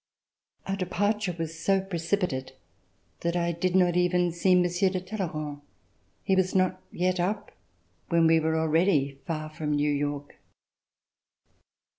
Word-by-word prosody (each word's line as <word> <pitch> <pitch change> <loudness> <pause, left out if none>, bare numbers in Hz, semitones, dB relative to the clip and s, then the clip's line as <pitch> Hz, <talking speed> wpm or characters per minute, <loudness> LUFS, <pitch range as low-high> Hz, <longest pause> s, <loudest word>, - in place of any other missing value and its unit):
Our 195 - -1
departure 200 +1 -1
was 165 0 -5
so 195 +2 +2
precipitate 175 -6 -2 0.7
that 170 0 -1
I 170 -1 +1
did 175 +2 -1
not 180 -2 +4
even 180 0 +2
see 180 +2 +3
Monsieur 180 +1 +2
de 185 0 -2
Talleyrand. 160 -7 -4 0.6
He 190 - +2
was 185 0 +1
not 185 0 +2
yet 180 +1 0
up 200 +4 -1 0.6
when 170 -1 +4
we 165 0 +5
were 160 0 0
already 160 -4 +2
far 155 -2 -3
from 150 -1 -3
New 145 0 +2
York. 145 0 -3
175 Hz, 135 wpm, -27 LUFS, 160-185 Hz, 0.7 s, we